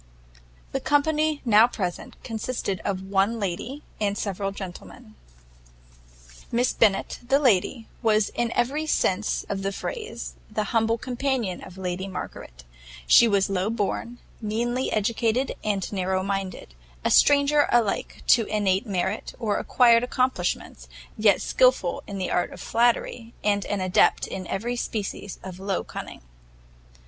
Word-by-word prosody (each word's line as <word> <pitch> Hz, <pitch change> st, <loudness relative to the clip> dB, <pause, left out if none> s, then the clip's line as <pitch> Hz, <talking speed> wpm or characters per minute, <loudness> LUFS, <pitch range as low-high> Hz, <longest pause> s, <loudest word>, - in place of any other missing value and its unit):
The -, -, -1 dB
company 305 Hz, +1 st, +1 dB
now 225 Hz, 0 st, +6 dB
present 185 Hz, -7 st, -4 dB
consisted 225 Hz, -4 st, -3 dB
of 190 Hz, -2 st, -2 dB
one 195 Hz, +4 st, +1 dB
lady 210 Hz, +9 st, -4 dB, 0.2 s
and 205 Hz, -1 st, 0 dB
several 195 Hz, -1 st, -2 dB
gentlemen. 180 Hz, -, -9 dB, 1.4 s
Miss 240 Hz, +1 st, +2 dB
Bennet, 200 Hz, -3 st, +2 dB
the 260 Hz, +3 st, +2 dB
lady, 230 Hz, -3 st, +2 dB
was 215 Hz, -3 st, +3 dB
in 240 Hz, -1 st, -2 dB
every 290 Hz, +6 st, 0 dB
sense 210 Hz, -7 st, 0 dB
of 195 Hz, -1 st, -3 dB
the 195 Hz, 0 st, -1 dB
phrase, 445 Hz, -, -5 dB, 0.2 s
the 215 Hz, 0 st, -1 dB
humble 225 Hz, 0 st, +2 dB
companion 250 Hz, -5 st, -2 dB
of 185 Hz, 0 st, -11 dB
Lady 185 Hz, 0 st, -3 dB
Margaret; 60 Hz, -, -8 dB, 0.4 s
she 235 Hz, -, +7 dB
was 200 Hz, -3 st, +2 dB
low 195 Hz, +1 st, 0 dB
born, 230 Hz, +2 st, -2 dB, 0.2 s
meanly 240 Hz, +4 st, -1 dB
educated, 230 Hz, +4 st, 0 dB
and 205 Hz, -2 st, -1 dB
narrow 185 Hz, -1 st, 0 dB
minded; 195 Hz, -, -4 dB, 0.3 s
a -, -, +2 dB
stranger 290 Hz, 0 st, +5 dB
alike 230 Hz, -4 st, 0 dB
to 230 Hz, -3 st, +5 dB
innate 205 Hz, 0 st, +1 dB
merit 190 Hz, +1 st, -2 dB
or 220 Hz, -4 st, 0 dB
acquired 235 Hz, -2 st, +5 dB
accomplishments, 240 Hz, -, -1 dB, 0.3 s
yet 210 Hz, -1 st, +3 dB
skilful -, -, +2 dB
in 200 Hz, -, -5 dB
the 185 Hz, -, -2 dB
art 175 Hz, -, 0 dB
of -, -, -10 dB
flattery, 235 Hz, 0 st, 0 dB
and 205 Hz, -1 st, +1 dB
an 205 Hz, -2 st, -1 dB
adept 185 Hz, -1 st, +3 dB
in 185 Hz, -2 st, -6 dB
every 235 Hz, +5 st, -2 dB
species 205 Hz, -4 st, -4 dB
of 185 Hz, -1 st, -8 dB
low 195 Hz, -1 st, -2 dB
cunning. -, -, -8 dB
215 Hz, 135 wpm, -25 LUFS, 195-240 Hz, 1.4 s, she